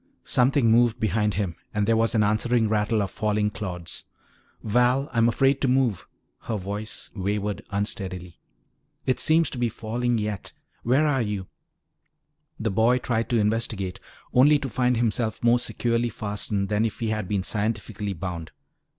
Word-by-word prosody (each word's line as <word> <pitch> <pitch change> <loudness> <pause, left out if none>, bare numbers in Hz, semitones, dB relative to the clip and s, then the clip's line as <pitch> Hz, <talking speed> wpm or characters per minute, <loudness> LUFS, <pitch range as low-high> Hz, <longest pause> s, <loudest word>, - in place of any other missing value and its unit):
Something 125 -2 +3
moved 120 0 +4
behind 105 0 +1
him 95 -5 -2 0.2
and 105 -1 +2
there 115 - +4
was 115 +1 +2
an 110 - +4
answering 110 +2 +2
rattle 105 0 +1
of 95 - -4
falling 105 -1 0
clods. 90 -5 -6 0.6
"Val, 125 +5 +2
I'm 115 0 +4
afraid 135 +3 +2
to 135 - +2
move," 125 -8 +1 0.4
her 110 - -2
voice 100 +3 -6
wavered 100 +1 -2
unsteadily. 95 -4 -4 0.7
"It 130 - +1
seems 160 -1 +4
to 125 - -6
be 120 -1 +1
falling 120 +2 -1
yet. 105 -2 -4 0.3
Where 130 +6 +3
are 140 -4 +2
you?" 105 -4 -3 1.1
The 110 -1 -1
boy 115 +5 +3
tried 115 -2 -1
to 120 - +2
investigate, 105 -3 -1 0.3
only 145 +4 +6
to 140 -2 -4
find 125 +2 +1
himself 115 -1 0
more 120 +1 +5
securely 120 -1 0
fastened 105 -2 -3
than 105 +1 +1
if 110 -3 -2
he 115 - -1
had 110 -3 -2
been 100 -2 -1
scientifically 105 -1 -2
bound. 85 -2 -5
110 Hz, 160 wpm, -25 LUFS, 105-120 Hz, 1.1 s, only